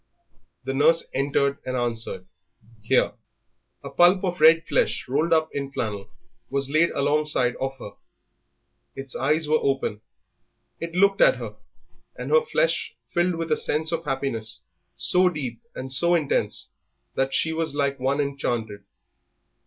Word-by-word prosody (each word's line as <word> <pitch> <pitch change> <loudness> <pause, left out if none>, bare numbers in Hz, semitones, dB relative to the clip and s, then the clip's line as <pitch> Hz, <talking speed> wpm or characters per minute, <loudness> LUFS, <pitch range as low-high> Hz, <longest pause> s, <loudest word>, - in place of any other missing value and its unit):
The 135 - -3
nurse 160 +4 +3
entered, 140 0 0
and 130 0 -3
answered, 115 -6 -2 0.6
"Here." 110 - +2 0.7
A - - -6
pulp 180 +2 +4
of 180 -3 -2
red 165 +1 +6
flesh - - 0
rolled 150 +6 0
up 160 -1 +3
in 140 -1 -4
flannel 105 -6 -4 0.4
was 140 0 -1
laid 155 +3 +4
alongside 145 -3 +1
of 135 0 -3
her. 105 -5 -9 1.0
Its 135 -1 -6
eyes 150 +4 +1
were 155 +1 +3
open; 135 -6 -1 0.8
it 165 0 -6
looked 195 +1 +3
at - - +6
her, - - -7 0.6
and - - -6
her 480 - +6
flesh - - 0 0.2
filled 175 0 +1
with 165 -1 -4
a 155 - +3
sense 155 +2 -1
of 165 -1 -2
happiness 130 -6 -3 0.3
so 180 0 +4
deep 150 - -5
and 130 +1 -6
so 170 +6 +3
intense 155 -5 -1 0.4
that 135 0 0
she 160 - +1
was 160 -2 -2
like 140 -2 0
one 135 +3 0
enchanted. 120 -7 -2
145 Hz, 145 wpm, -24 LUFS, 130-165 Hz, 1.0 s, red